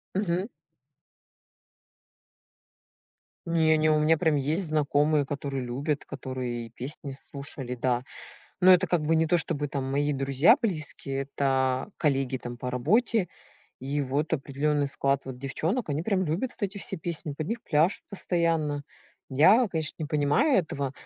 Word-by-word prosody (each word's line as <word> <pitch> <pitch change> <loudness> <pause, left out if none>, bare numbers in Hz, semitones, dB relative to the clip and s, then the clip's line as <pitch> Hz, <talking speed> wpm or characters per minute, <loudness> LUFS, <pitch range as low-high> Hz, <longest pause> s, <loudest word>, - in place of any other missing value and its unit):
Мгм. 190 +1 0 3.0
Не, 160 -1 +3
не. 155 0 +3
У 155 - +4
меня 155 +1 +3
прям 160 -3 +2
есть 155 +7 0
знакомые, 150 -1 +2
которые 140 -1 -4
любят, 140 +4 -2
которые 125 -3 -5
и - - -15
песни 140 +4 -5
слушали. 135 -2 -6
Да. 125 0 0 0.6
Но 185 0 +8
это 180 +1 +4
как 175 -3 +1
бы 160 +2 +2
не 160 0 +2
то, 175 +2 +3
чтобы 145 -1 -2
там 135 -1 -3
мои 145 +2 +1
друзья 135 - +4
близкие. 155 -8 -2
Это 130 0 0
коллеги, 135 -4 +1
там, 120 0 -7
по 125 +1 -4
работе. 185 - +1 0.5
И, 140 +3 -2
вот, 140 +4 -1
определённый 145 0 0
склад 140 0 0
вот 130 -2 -7
девчонок. 160 - -2
Они 145 +2 -1
прям 190 -1 +1
любят 175 +11 -1
вот - - -7
эти 200 +1 -2
все - - -3
песни. 160 -2 -4
Под 155 +2 -5
них 235 +1 -3
пляшут 160 +5 +2
постоянно. 165 -6 0 0.5
Я, 190 - +5
конечно, 160 -3 -2
не 155 - -2
понимаю 155 - +3
этого, 140 -5 -3
150 Hz, 150 wpm, -27 LUFS, 135-170 Hz, 3.0 s, Но